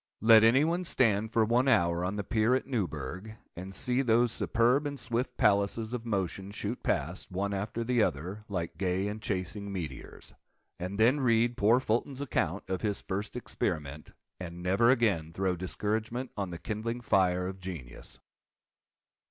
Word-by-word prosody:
Let 110 0 +7
any 120 +6 +5
one 175 +3 0
stand 110 - +1
for 110 -1 +3
one 120 +4 +2
hour 85 -8 +3
on 95 +3 -2
the 100 - -2
pier 115 +2 +2
at 130 - -1
Newburgh, 95 - -4 0.2
and 95 +3 -7
see 125 0 +1
those 120 -1 +3
superb 125 +7 +2
and 140 -1 -5
swift 120 +2 -2
palaces 105 +3 +2
of 120 -1 -4
motion 95 -2 -2
shoot 105 +3 -4
past, 85 +7 -2
one 100 +2 -2
after 105 +4 -3
the 120 0 +2
other, 90 +5 -2
like 90 -4 -4
gay 95 +1 0
and 105 +1 -5
chasing 100 +1 -3
meteors; 80 -8 -7 0.5
and 95 +3 -5
then 125 +6 +4
read 120 -2 +2
poor 115 +2 +4
Fulton's 130 +3 -1
account 100 - -2
of 95 -1 -2
his 105 -2 -1
first 100 +4 -4
experiment—and 85 - -5
never 95 +6 +3
again 100 -11 +2
throw 95 0 0
discouragement 110 +7 -2
on 100 -3 -3
the 85 - -6
kindling 110 +7 -4
fire 90 -5 +2
of 95 +1 -5
genius. 85 -10 -8
105 Hz, 160 wpm, -30 LUFS, 90-115 Hz, 0.5 s, Let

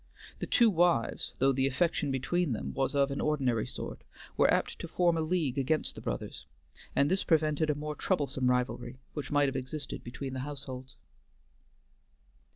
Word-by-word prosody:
The - - -3
two 235 -2 +5
wives, 170 - +1
though 135 +1 +4
the 135 0 +2
affection 150 +1 +1
between 135 +4 0
them 110 - -4
was 135 +2 0
of 140 0 +3
an 140 - -2
ordinary 130 -7 +1
sort, - - -6 0.3
were - - +4
apt - - 0
to - - -5
form 170 0 +2
a 165 - 0
league 155 -5 0
against 155 +4 +1
the - - -9
brothers, 70 - -5 0.5
and 140 +3 +3
this 190 - +2
prevented 155 -1 +2
a 150 - +2
more 150 +1 -4
troublesome 140 -6 0
rivalry 125 0 -1 0.2
which 150 - -5
might 145 -1 +3
have 135 - -2
existed 135 +3 -4
between 130 +2 -6
the 130 - -3
households. 130 -2 -7
140 Hz, 170 wpm, -31 LUFS, 130-155 Hz, 0.5 s, two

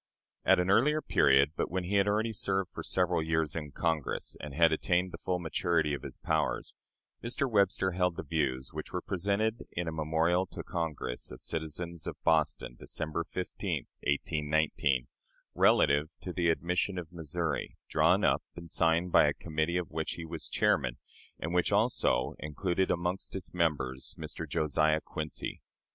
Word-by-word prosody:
At - - +5
an 90 +2 +2
earlier 150 +9 +4
period 70 - +4
but - - -1
when 95 +1 -1
he 100 +3 0
had 100 0 +3
already 110 +2 +1
served 95 -2 0
for - - -5
several 90 -2 +1
years 80 -1 0
in 75 -3 -4
Congress, 80 +1 -1
and 75 - -6
had 80 +3 +4
attained 90 +3 +1
the - - -8
full 90 - -1
maturity 85 -2 0
of 70 - -3
his - - -7
powers 80 -1 -1 0.5
Mr. 120 +4 0
Webster 100 -4 +2
held 90 -1 +1
the - - -5
views 65 -6 -1
which 75 0 -6
were 90 - -2
presented 100 +4 0
in 85 0 -2
a - - -1
memorial 80 +4 +1
to - - -7
Congress 80 -7 -3
of 65 - -9
citizens 80 +1 -3
of - - -4
Boston, 80 -6 +1
December 80 +1 -2
15, 90 +2 -3 0.2
1819, 75 -2 +1 0.5
relative 75 +2 +4
to 90 - -6
the 85 -2 +1
admission 90 +3 0
of 85 -1 -6
Missouri, 85 0 -3
drawn - - +3
up - - +3
and 85 -1 -10
signed 85 +2 +2
by - - +6
a - - +1
committee 80 +2 -1
of 90 - -3
which 80 0 -2
he 85 - -6
was 80 0 -4
chairman, 60 -1 +1 0.4
and 80 +2 -4
which 90 +2 +2
also 100 - +2
included 90 +4 -1
among 90 +2 0
its 90 -2 -6
members 75 -7 0
Mr. - - -5
Josiah 75 0 +2
Quincy. 75 -1 -4
85 Hz, 165 wpm, -31 LUFS, 75-90 Hz, 0.5 s, by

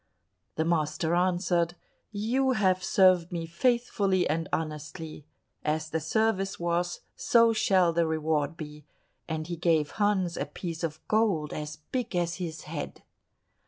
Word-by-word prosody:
The 160 - 0
master 160 0 0
answered, 175 -1 +1 0.4
"You 245 +6 +1
have 185 -5 +2
served 185 -2 +4
me 170 -2 -3
faithfully 200 0 +1
and 165 +2 -1
honestly; 155 0 -4 0.4
as 155 +1 -1
the 160 - 0
service 195 +3 0
was 175 +1 -1
so 230 -1 +4
shall 190 -6 +3
the 170 0 +2
reward 155 0 0
be;" 150 -1 -8 0.5
and 160 -1 -2
he 175 +1 -4
gave 160 -3 +2
Hans 190 -4 +2
a - - -2
piece 165 -3 -6
of 160 -1 -4
gold 205 -9 +1
as 150 0 -5 0.2
big 245 -6 -2
as 175 0 0
his 165 -4 -5
head. 150 -1 -6
170 Hz, 140 wpm, -28 LUFS, 160-190 Hz, 0.5 s, served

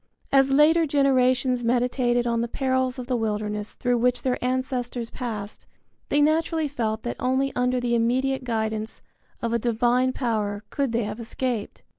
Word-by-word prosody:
As 270 0 +5
later 315 +4 +5
generations 255 -3 +2
meditated 245 0 +1
on 235 -1 0
the 235 - -1
perils 260 0 0
of 250 - -5
the 255 0 -1
wilderness 210 -2 -2
through 245 -1 0
which 250 +1 +1
their 255 -2 -1
ancestors 250 -2 -2
passed, 215 -5 -6 0.4
they 290 - +3
naturally 320 +1 +1
felt 225 -6 -2
that 240 - -4
only 265 +2 0
under 250 0 +1
the 245 -1 -1
immediate 255 +3 +1
guidance 220 -2 -3 0.4
of 235 0 0
a 235 - +2
divine 240 +2 +2
power 215 -5 -2
could 275 -4 -1
they 235 0 0
have 210 +2 -5
escaped. 230 -1 -4
245 Hz, 160 wpm, -25 LUFS, 230-260 Hz, 0.4 s, As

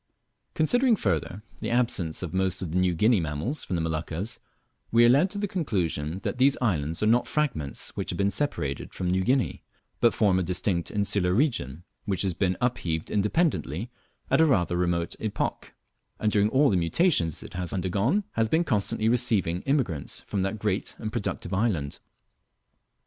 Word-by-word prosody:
Considering, 245 - +3
further, 105 - -2 0.2
the - - -3
absence 105 -10 0
of 85 - -5
most 95 0 0
of 85 - -5
the 90 - +1
New 90 -1 +2
Guinea 110 +5 +4
mammals 80 - -3
from 90 - -3
the 85 - 0
Moluccas, 80 +7 -3 0.5
we 115 +1 +6
are - - +6
led 145 +9 +4
to 205 - -6
the 205 0 -1
conclusion 90 - -2
that - - -3
these 135 +2 +4
islands 85 - 0
are - - +3
not 115 +3 +3
fragments 125 - -2
which - - -4
have - - -2
been 100 0 +1
separated 75 - -3
from 90 - -3
New 95 +1 +1
Guinea, 130 +4 +1 0.4
but 120 - +5
form 95 -4 +3
a - - +1
distinct 90 0 0
insular 100 -3 +1
region, 110 - 0 0.2
which 95 -2 -1
has 95 -2 0
been 90 +1 0
upheaved 85 -10 -2
independently 105 - 0 0.4
at - - +5
a - - +6
rather 90 - +2
remote 85 -1 0
epoch, 110 -2 -3 0.4
and 105 - +1
during 105 0 +3
all 135 +3 +4
the 95 - +2
mutations 85 - +1
it - - -11
has 90 -1 -4
undergone 100 - 0
has 115 -1 0
been 160 +7 +3
constantly 110 - 0
receiving 110 -8 +1
immigrants 120 - 0
from 100 - -3
that 95 +3 -1
great 105 -1 -1
and 110 -1 -5
productive 100 -4 -3
island. 95 -9 -1
100 Hz, 175 wpm, -26 LUFS, 85-120 Hz, 0.5 s, we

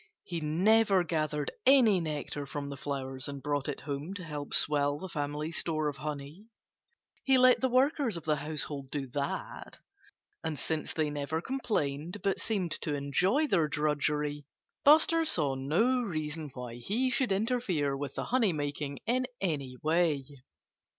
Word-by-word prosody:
He 170 -2 -4
never 195 +5 +4
gathered 155 -3 -1
any 250 -8 +6
nectar 150 -2 -4
from 140 0 -5
the 140 - -5
flowers 135 -1 -4
and 140 -1 -5
brought 145 -1 -1
it 145 - -4
home 145 +6 -4
to 190 - -6
help 150 -3 -6
swell 145 -1 +3
the 190 - -6
family 150 -1 -3
store 155 -2 -1
of 140 - -7
honey. 150 +6 -6 0.8
He 270 -1 +5
let 255 0 +6
the 260 - +2
workers 260 - +2
of 165 - -7
the 155 -2 +1
household 145 -2 -4
do 145 -1 -3
that. 140 +1 -4 0.7
And 160 -2 -2
since 160 +1 -2
they 155 -2 0
never 145 +2 -2
complained, 175 - -2
but 195 -1 +1
seemed 190 -7 -1
to 150 -3 -1
enjoy 180 - +2
their 170 - +2
drudgery, 150 -1 -1 0.4
Buster 320 +3 +6
saw 155 - +2
no 180 - +2
reason 155 -6 -4
why 125 -1 -6
he 230 - 0
should 245 -2 +1
interfere 195 - 0
with 135 -1 -5
the - - -2
honey 235 -7 +2
making 145 -1 -3
in 255 +2 +1
any 140 -8 -2
way. 160 -3 +2
155 Hz, 155 wpm, -30 LUFS, 145-200 Hz, 0.8 s, any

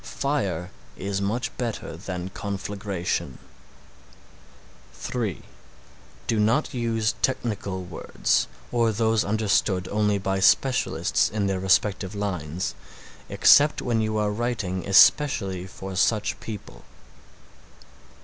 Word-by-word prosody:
Fire 100 - -2 0.3
is 100 +1 -3
much 115 +5 -2
better 115 -9 -4
than 90 +1 -5
conflagration. 100 -2 -4 1.6
(3) 110 -8 -3 0.8
Do 115 - 0
not 115 +9 +2
use 115 -2 0
technical 100 -7 -1
words, 90 -1 -1 0.2
or 115 -2 +2
those 110 0 +1
understood 100 -3 +1
only 105 -1 +1
by 95 0 -1
specialists 125 +6 +2
in 105 -1 -1
their 95 -1 0
respective 95 +1 +1
lines, 90 -4 -3 0.6
except 150 +1 +5
when 115 -3 0
you 110 0 -1
are 105 -1 +1
writing 105 -5 -2
especially 95 -3 +4
for 95 0 -8
such 105 +2 +1
people. 100 - -9
105 Hz, 100 wpm, -25 LUFS, 95-115 Hz, 1.6 s, except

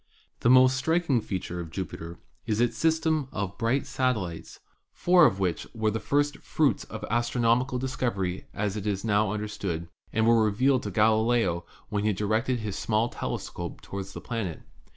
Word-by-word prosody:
The 115 - +2
most 130 +1 +6
striking 160 -3 +1
feature 90 -3 -4
of 85 -2 -6
Jupiter 85 -1 -6 0.3
is 110 0 0
its 120 0 +2
system 160 -3 +1
of 100 -4 -3
oright 120 +5 +1
satellites, 120 -11 -2 0.3
four 175 -3 +5
of 95 - -1
which 90 -4 -1
were 110 -1 +1
the 110 - -2
first 145 +3 +1
fruits 150 -3 +1
of 110 - -7
astronomical 120 +2 +2
discovery 120 -8 -2
as 105 -1 -2
it 105 -1 -4
is 100 0 -1
now 105 -1 +2
understood, 100 -6 -4 0.2
and 110 0 +2
were 115 -1 +5
revealed 125 +5 +2
to 105 - -4
Galileo 110 -3 +2 0.2
when 105 -1 -1
he 105 0 +2
directed 110 +5 0
his 105 -3 -4
small 110 +2 +1
telescope 85 -7 -5
toward 100 -1 -5
the 100 - -9
planet. 110 -9 -4
110 Hz, 165 wpm, -27 LUFS, 100-125 Hz, 0.3 s, most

